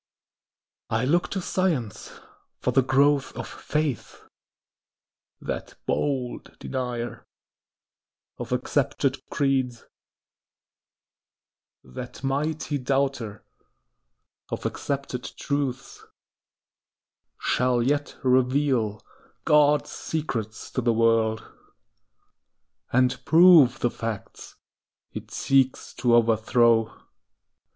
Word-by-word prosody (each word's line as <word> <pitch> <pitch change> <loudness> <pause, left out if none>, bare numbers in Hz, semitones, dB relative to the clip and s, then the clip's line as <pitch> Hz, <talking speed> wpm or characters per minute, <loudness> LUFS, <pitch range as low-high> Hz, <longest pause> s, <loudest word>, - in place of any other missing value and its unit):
I 115 +3 0
look 170 +6 +2
to 195 - -3
Science 165 - -2 0.5
for - - -1
the 135 - +4
growth 135 +2 +2
of - - -5
faith. 150 -5 -3 1.2
That - - -5
bold 130 -4 -2
denier 125 -3 -4 1.2
of - - -6
accepted - - 0
creeds— 130 -4 0 2.0
That 65 - -9
mighty 145 +2 -1
doubter 135 -5 -1 1.0
of - - -5
accepted 140 -3 -3 0.2
truths— 135 -2 -3 1.4
Shall 125 -1 +1
yet 145 +3 -1
reveal 130 -4 +1 0.4
God's 150 0 +4
secrets 115 -9 -4
to 130 - -1
the 120 -1 +2
world, 115 -1 +2 1.5
And 125 +1 +2
prove 165 -6 +6
the 120 - +1
facts 115 -3 -6 0.6
it - - -8
seeks 135 -1 +1
to 120 -2 +4
overthrow. 115 0 +3
130 Hz, 80 wpm, -25 LUFS, 115-145 Hz, 2.0 s, prove